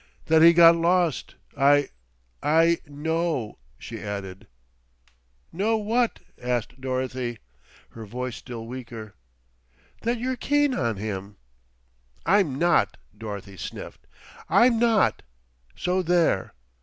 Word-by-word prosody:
"That 160 Hz, 0 st, +4 dB
he 165 Hz, +1 st, +9 dB
got 170 Hz, 0 st, +7 dB
lost. 170 Hz, -2 st, +1 dB, 0.2 s
I 145 Hz, 0 st, +4 dB, 0.5 s
I 165 Hz, +3 st, +3 dB
know," 155 Hz, -4 st, -2 dB, 0.2 s
she -, -, -8 dB
added. 95 Hz, -2 st, -6 dB, 1.1 s
"Know 215 Hz, +6 st, +1 dB
what?" 225 Hz, +3 st, 0 dB, 0.2 s
asked 125 Hz, +1 st, -3 dB
Dorothy, 130 Hz, -2 st, -3 dB, 0.5 s
her 110 Hz, -2 st, -10 dB
voice 125 Hz, +2 st, -5 dB
still 115 Hz, -3 st, -8 dB
weaker. 115 Hz, -3 st, -8 dB, 0.9 s
"That 235 Hz, +2 st, 0 dB
you're 255 Hz, +2 st, -2 dB
keen 290 Hz, 0 st, +2 dB
on 115 Hz, -, -1 dB
him." 100 Hz, -1 st, -5 dB, 0.9 s
"I'm 180 Hz, -8 st, +3 dB
not," 170 Hz, +2 st, +2 dB, 0.2 s
Dorothy 100 Hz, -2 st, -8 dB
sniffed. -, -, -8 dB, 0.4 s
"I'm 235 Hz, -1 st, +5 dB
not, 230 Hz, -3 st, +3 dB, 0.5 s
so 180 Hz, +1 st, 0 dB
there." 170 Hz, -, +1 dB
145 Hz, 105 wpm, -25 LUFS, 115-180 Hz, 1.1 s, he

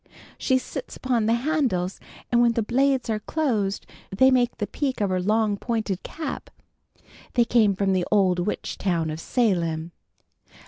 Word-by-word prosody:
She 260 Hz, -, +2 dB
sits 260 Hz, 0 st, -6 dB
upon 240 Hz, -4 st, 0 dB
the 230 Hz, -, +3 dB
handles, 235 Hz, -, 0 dB, 0.3 s
and 240 Hz, 0 st, +4 dB
when 235 Hz, -1 st, +4 dB
the 230 Hz, -, 0 dB
blades 265 Hz, +3 st, +1 dB
are 220 Hz, -2 st, -1 dB
closed 215 Hz, -7 st, -1 dB, 0.2 s
they 260 Hz, +8 st, +4 dB
make 245 Hz, -2 st, +2 dB
the 205 Hz, -, -1 dB
peak 270 Hz, +4 st, -3 dB
of 200 Hz, -3 st, 0 dB
her 185 Hz, -1 st, 0 dB
long 210 Hz, +1 st, +1 dB
pointed 220 Hz, -5 st, -2 dB
cap. 315 Hz, -1 st, -6 dB, 0.9 s
They 240 Hz, -2 st, +4 dB
came 220 Hz, -4 st, +3 dB
from 195 Hz, 0 st, +1 dB
the 185 Hz, -2 st, 0 dB
old 190 Hz, -4 st, +3 dB
witch 190 Hz, +4 st, -3 dB
town 170 Hz, -5 st, 0 dB
of 155 Hz, -, -5 dB
Salem." 170 Hz, -7 st, 0 dB
215 Hz, 165 wpm, -24 LUFS, 190-250 Hz, 0.9 s, and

